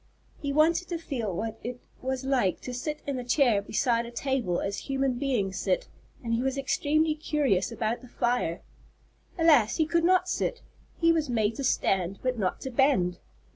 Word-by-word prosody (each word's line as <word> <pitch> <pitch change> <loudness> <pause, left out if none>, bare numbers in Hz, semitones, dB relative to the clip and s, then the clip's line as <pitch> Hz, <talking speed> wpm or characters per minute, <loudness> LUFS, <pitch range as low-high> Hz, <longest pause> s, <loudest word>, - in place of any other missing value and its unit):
He 285 -2 -2
wanted 325 +4 +3
to 345 - -2
feel 255 -10 -3
what 225 +5 -4
it 245 +1 -5 0.2
was 260 0 -2
like 250 -9 +1
to 250 - -6
sit 300 +5 -4
in 275 -3 -2
a - - -4
chair 245 -4 +3
beside 235 +3 0
a - - -9
table 240 -8 -1
as 200 0 -2
human 270 -2 0
beings 210 -9 0
sit, - - 0 0.4
and 230 -1 -1
he 230 - +1
was 265 +1 -1
extremely 305 +3 +1
curious 285 -10 0
about 230 0 -2
the 255 - -12
fire. 240 -8 -1 0.8
Alas, 295 -10 +5
he 320 - +2
could 335 +2 +1
not 365 +1 +4
sit! 470 +6 -2 0.3
He 330 0 +4
was 315 -4 0
made 220 -2 +1
to 275 - -3
stand 195 -6 +1
but 255 -2 -1
not 185 -3 -1
to 265 - -5
bend. 240 -10 +2
255 Hz, 185 wpm, -28 LUFS, 225-300 Hz, 0.8 s, Alas